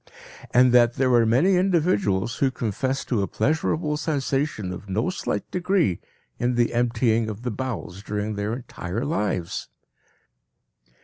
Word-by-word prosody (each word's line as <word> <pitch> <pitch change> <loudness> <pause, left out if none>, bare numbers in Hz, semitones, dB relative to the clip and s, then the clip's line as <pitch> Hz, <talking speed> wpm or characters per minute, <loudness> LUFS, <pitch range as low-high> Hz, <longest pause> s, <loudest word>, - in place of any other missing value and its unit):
And 125 0 +5
that 120 -1 +5
there 130 -1 +2
are 115 -2 +5
many 170 +12 +4
individuals 150 - +1
who 135 - +2
confess 130 +3 -2
to 115 -5 0
a 95 - -1
pleasurable 150 +4 0
sensation 140 - -1
of 100 +2 -9
no 110 - 0
slight 185 - -3
degree 180 - +1 0.4
in 120 +1 +1
the 120 0 +2
emptying 115 -2 +1
of 110 +2 -7
the 125 - -2
bowels 110 -6 -5
during 105 +1 -3
their 105 +1 -2
entire 115 -2 -5
lives! 105 - -2
120 Hz, 140 wpm, -24 LUFS, 105-140 Hz, 0.4 s, And